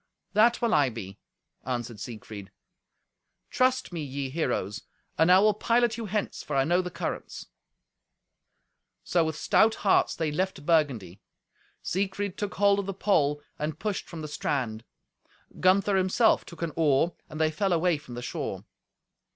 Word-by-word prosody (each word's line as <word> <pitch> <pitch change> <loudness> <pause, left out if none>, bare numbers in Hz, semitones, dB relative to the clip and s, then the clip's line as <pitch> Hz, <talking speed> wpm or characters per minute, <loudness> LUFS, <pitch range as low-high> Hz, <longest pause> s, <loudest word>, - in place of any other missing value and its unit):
"That 230 +4 +4
will 230 -1 +2
I 140 -3 +4
be," 105 -4 -8 0.4
answered 120 -3 -4
Siegfried. 105 -2 -8 1.0
"Trust 255 -6 +1
me, 165 - -3
ye 135 -1 -4
heroes, 105 - -2 0.3
and 160 +3 +4
I 185 - +8
will 210 +2 +5
pilot 235 +2 +2
you 230 -1 -5
hence, 210 +1 -2
for 145 - -5
I 135 - +4
know 175 +5 +2
the 180 - -5
currents." - - -5 1.6
So 175 -2 +2
with 160 -1 -2
stout 220 +7 +3
hearts 195 - +3
they 160 -2 -1
left 185 -1 -2
Burgundy. 135 - +1 0.6
Siegfried 195 +1 -2
took 205 -1 -4
hold 200 0 +4
of 200 - -3
the 195 - -4
pole 150 -8 +1 0.2
and 150 +1 -3
pushed 210 -3 -3
from 165 -2 -7
the 155 - -5
strand. 125 -7 -2 0.8
Gunther 195 +2 +3
himself 190 +5 +3
took 170 0 -8
an 165 - -2
oar, 160 +1 +2 0.2
and 155 0 -7
they 155 0 +2
fell 195 +5 0
away 170 -2 +2
from 125 -5 -10
the 120 - -6
shore. 120 - -4
165 Hz, 160 wpm, -27 LUFS, 140-200 Hz, 1.6 s, I